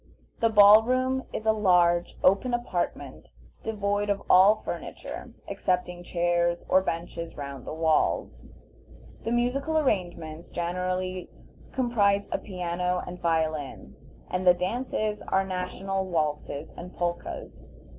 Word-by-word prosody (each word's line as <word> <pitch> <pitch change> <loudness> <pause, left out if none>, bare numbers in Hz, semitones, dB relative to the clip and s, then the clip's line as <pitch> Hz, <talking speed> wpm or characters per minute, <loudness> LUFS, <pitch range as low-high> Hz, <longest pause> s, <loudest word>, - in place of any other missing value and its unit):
The 230 - +3
ball 210 0 +8
room 255 +2 0
is 220 - -5
a 220 - +5
large, 175 -5 +3
open 200 +7 +3
apartment 210 -7 -4 0.3
devoid 205 -1 -1
of 200 -1 0
all 195 +4 +6
furniture - - -7
excepting 180 -1 -1
chairs 175 0 0
or 185 - +4
benches 170 -2 -4
round 140 -2 -7
the - - -4
walls; 160 -1 +1 0.8
the 225 - -1
musical 265 +6 0
arrangements 175 - -2
generally 185 +1 -3 0.4
comprise 205 -6 +2
a - - 0
piano 180 -1 -2
and 180 0 -8
violin, 160 -4 -1 0.3
and 180 0 -2
the 180 - +8
dances 215 +2 -2
are 190 0 +2
national 190 +1 -3
waltzes 155 -3 -2
and 180 +1 -9
polkas. 175 0 -4
185 Hz, 120 wpm, -27 LUFS, 175-210 Hz, 0.8 s, ball